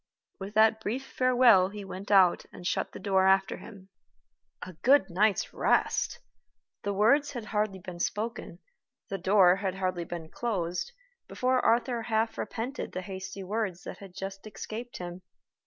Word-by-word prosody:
With 195 +2 -7
that 220 0 +5
brief 245 +6 -3
farewell 245 -9 +4
he 205 0 -8
went 190 +1 -8
out 190 -4 +5
and 175 - -11
shut - - -1
the - - -9
door 190 -1 +2
after 190 0 +3
him. 195 -4 -13 0.7
A 185 - -8
good 260 -7 +4
night's 200 +3 +1
rest! - - +1 0.6
The 205 - -2
words 240 +9 +3
had 240 -4 -5
hardly 210 -2 -1
been 180 -2 -9
spoken, 220 +6 -3 0.5
the 195 - -3
door 185 0 +5
had 195 -2 -2
hardly 185 -2 -2
been 165 -2 -7
closed, 185 - -2 0.4
before 255 0 +1
Arthur 235 +1 +2
half 225 0 -1
repented 250 +5 -4
the 185 - -4
hasty 190 0 -7
words 195 -2 -3
that - - -8
had 195 -3 -12
just 195 +1 -6
escaped 220 +4 -7
him. 175 0 -7
200 Hz, 155 wpm, -29 LUFS, 185-225 Hz, 0.7 s, that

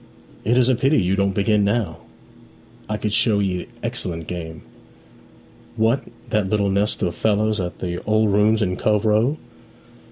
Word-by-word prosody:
'It 120 +3 +2
is 125 -1 +4
a 130 - +4
pity 135 +5 +2
you 95 0 +1
don't 100 -1 0
begin 105 +1 +2
now. 100 -5 0 0.9
I 105 - -1
could 105 -1 -2
show 110 -2 +3
'ee 95 -3 -2 0.2
excellent 95 -9 -3
game.' 80 -2 -7 1.1
'What, 115 +4 +1 0.3
that 105 -3 +1
little 100 -1 +1
nest 105 +2 0
of 85 - 0
fellows 110 +1 +1
at 90 -1 -4
the 90 -1 -4
"Old 110 0 +2
Rooms" 105 +2 +3
in 90 -2 -1
Cove 105 0 +1
Row? 110 +8 +2
105 Hz, 160 wpm, -21 LUFS, 95-110 Hz, 1.1 s, is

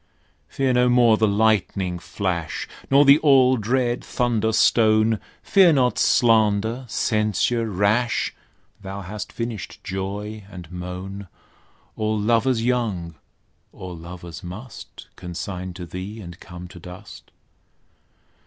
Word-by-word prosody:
Fear 135 -2 0
no 125 0 +3
more 120 -2 +5
the 110 0 +2
lightning 100 -4 +1
flash, 85 -4 -3 0.2
Nor 140 +2 +6
the 140 +2 +7
all 135 -4 +5
dread 120 +2 0
thunder 115 -3 0
stone; 110 -1 +3 0.2
Fear 190 -4 +5
not 125 -3 +2
slander, 110 +1 +3
censure 110 +1 0
rash; 105 +5 +1 0.5
Thou 95 +1 -6
hast 100 +3 -7
finished 115 -5 -5
joy 100 +3 -5
and 90 -4 -10
moan; 90 +2 -7 0.7
All 110 0 -1
lovers 115 +2 +2
young, 110 -9 -1 0.6
all 90 -1 -8
lovers 85 0 -9
must 105 +8 -10
Consign 90 0 -6
to 90 - -7
thee, 95 +6 -7
and 85 -4 -10
come 90 -1 -10
to 90 - -12
dust. 90 +4 -12
105 Hz, 115 wpm, -23 LUFS, 90-120 Hz, 0.7 s, the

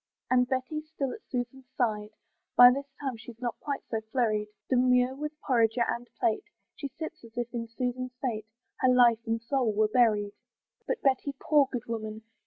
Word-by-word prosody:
And 250 -1 +4
Betty's 295 +4 -2
still 275 -4 -2
at - - -8
Susan's 255 0 -4
side: 210 -4 0 0.5
By 245 +1 +11
this 275 +2 -3
time 265 -5 -3
she's 230 +1 -11
not 240 -1 -3
quite 285 -2 -3
so 225 -1 -1
flurried; 215 -4 +1 0.2
Demure 250 0 +3
with 300 +2 -6
porringer 235 -2 +2
and 240 +1 -3
plate 230 - +1 0.3
She 280 - -4
sits, 315 +2 -8
as 230 0 -15
if 240 0 -3
in 230 -1 -3
Susan's 250 +2 -3
fate 220 -5 -2 0.3
Her 255 - +4
life 240 -3 +6
and 225 0 +1
soul 240 0 0
were 215 +1 +3
buried. 215 -3 +3 0.5
But - - -2
Betty, 275 +1 +1
poor 290 -2 +4
good 245 -3 -3
woman! 220 -1 -5
245 Hz, 180 wpm, -29 LUFS, 225-265 Hz, 0.5 s, By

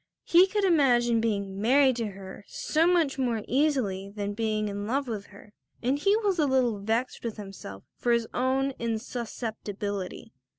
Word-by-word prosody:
He 355 +3 +6
could 415 +1 -1
imagine 245 -10 +4
being 200 -3 -2
married 260 +2 +4
to 230 -2 -1
her 195 0 -9
so 320 +2 +1
much 330 -7 +2
more 235 -4 0
easily 250 -9 0
than 205 0 -4
being 215 -1 -1
in 205 0 -4
love 275 +3 0
with 210 -4 -5
her, 205 +1 -16 0.3
and 265 +4 +1
he 395 +7 +3
was 405 -5 0
a 300 - +3
little 250 -5 +2
vexed 225 +5 -2
with 230 -2 -4
himself 195 - -9
for 240 - 0
his 235 -1 +2
own 265 +2 +1
insusceptibility. 220 - -4
235 Hz, 165 wpm, -27 LUFS, 205-270 Hz, 0.3 s, He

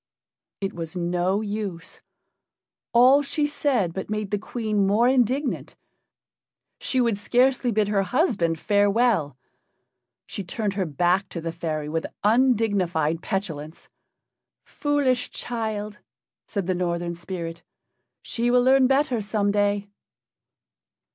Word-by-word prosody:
It 195 +1 -2
was 165 +1 -6
no 180 +3 0
use. 205 -5 -5 0.9
All 255 +4 +6
she 290 +1 -1
said 260 - 0
but 190 +2 -5
made 215 -2 -3
the 205 - 0
Queen 215 -2 -1
more 215 +5 +3
indignant. 260 +2 0 1.0
She 260 - -1
would 230 -5 +1
scarcely 250 +3 +2
bid 215 -1 +1
her 205 -2 +2
husband 195 - +1
farewell: 205 - +2 0.9
she 200 - -6
turned 205 +3 -2
her 190 -3 -1
back 175 +6 +1
to 170 - -5
the 165 0 -4
fairy 155 -3 -3
with 160 +2 -2 0.2
undignified 205 - +2
petulance. 165 -7 -5 0.8
"Foolish 285 -4 0
child," 215 -3 -4 0.5
said 200 -4 -3
the 185 - 0
Northern 175 -1 -2
spirit. 170 -1 -6 0.6
"She 235 +1 -1
will 245 0 +4
learn 260 0 +5
better 270 -3 +1
some 205 0 0
day." 205 0 +1
205 Hz, 120 wpm, -24 LUFS, 175-240 Hz, 1.0 s, All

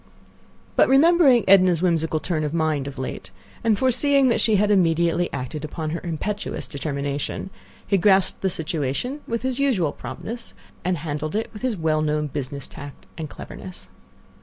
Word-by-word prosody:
But - - +5
remembering 275 -3 +5
Edna's 185 -3 +5
whimsical 160 -3 +1
turn 155 -2 -2
of 150 +2 -2
mind 155 -4 0
of 140 - -7
late, 130 -7 -5 0.3
and 225 -3 +3
foreseeing 260 +3 +3
that 235 - +2
she 220 - +3
had 205 +1 +3
immediately 170 -2 +2
acted 140 +3 -5
upon 155 0 -4
her 165 - -3
impetuous 200 +5 -3
determination, 140 +4 -3 0.3
he 195 - +2
grasped 190 0 +3
the 190 - +1
situation 165 - -3
with 230 0 -2
his 260 0 -1
usual 215 - +2
promptness 145 - -7 0.3
and 180 0 0
handled 155 +2 -4
it 220 - -2
with 210 - -9
his 250 -5 -1
well 155 -2 +1
known 150 0 0
business 140 -1 -5
tact 145 -1 -11
and 160 -2 -6
cleverness. 185 +4 -9
170 Hz, 160 wpm, -23 LUFS, 150-215 Hz, 0.3 s, But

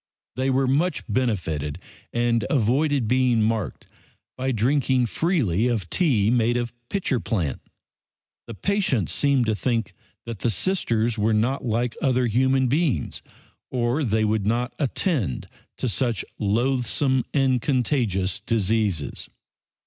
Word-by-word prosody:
They 130 +2 0
were 135 +1 +2
much 150 +8 +1
benefited 90 - -1 0.3
and 120 -1 +1
avoided 135 +1 +2
being 125 -2 +3
marked 110 -2 -2 0.5
by 130 +1 -1
drinking 130 +2 +2
freely 120 - +1
of 110 -8 -2
tea 120 - +2
made 120 0 +2
of 120 -1 -3 0.2
"pitcher 175 -10 0
plant." 90 - -2 0.9
The 115 - -7
patients 185 - 0
seemed 140 -4 +2
to 110 - +1
think 115 +1 -1 0.3
the 115 0 -2
Sisters 115 - 0
were 110 +1 +2
not 125 +6 0
like 115 +1 0
other 130 -2 +2
human 130 +3 +2
beings, 145 +2 0 0.5
or 125 +4 0
they 110 -3 +1
would 105 -1 0
not 120 +3 0
attend 135 - -1 0.3
to - - -2
such 120 0 -1
loathsome 125 +4 +1
and 130 -3 +2
contagious 115 - 0
diseases. 105 - -1
120 Hz, 125 wpm, -24 LUFS, 110-130 Hz, 0.9 s, being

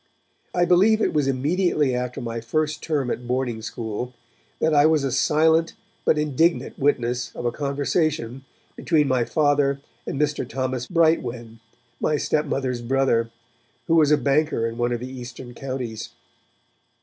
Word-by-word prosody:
I 175 -1 +3
believe 200 +5 +4
it - - +1
was 150 -3 +1
immediately 145 +1 +1
after 125 0 -3
my 115 -1 -4
first 155 +6 -1
term 145 -6 -1
at 120 0 -5
boarding 125 -2 -1
school, 115 +2 -5 0.4
that 160 0 +2
I 145 +1 +6
was 155 -3 +2
a 135 - -1
silent 160 +5 +3 0.3
but 155 - +3
indignant 150 +3 +1
witness 125 -3 0
of - - -5
a 120 - +1
conversation 140 -2 -1 0.3
between 155 -4 +2
my 130 -3 +1
Father 145 -2 +2 0.3
and 140 - -3
Mr. 150 -4 -1
Thomas 130 -1 -2
Brightwen, 125 -9 0 0.4
my 150 - +1
stepmother's 135 -5 -1
brother, 120 -2 +1 0.6
who 165 - +1
was 155 -3 +5
a 150 - +5
banker 140 -2 +1
in 115 +1 -4
one 120 0 +1
of 120 -1 -2
the 125 - -5
Eastern 125 -1 -9
Counties. 125 -4 -5
135 Hz, 150 wpm, -23 LUFS, 120-155 Hz, 0.6 s, I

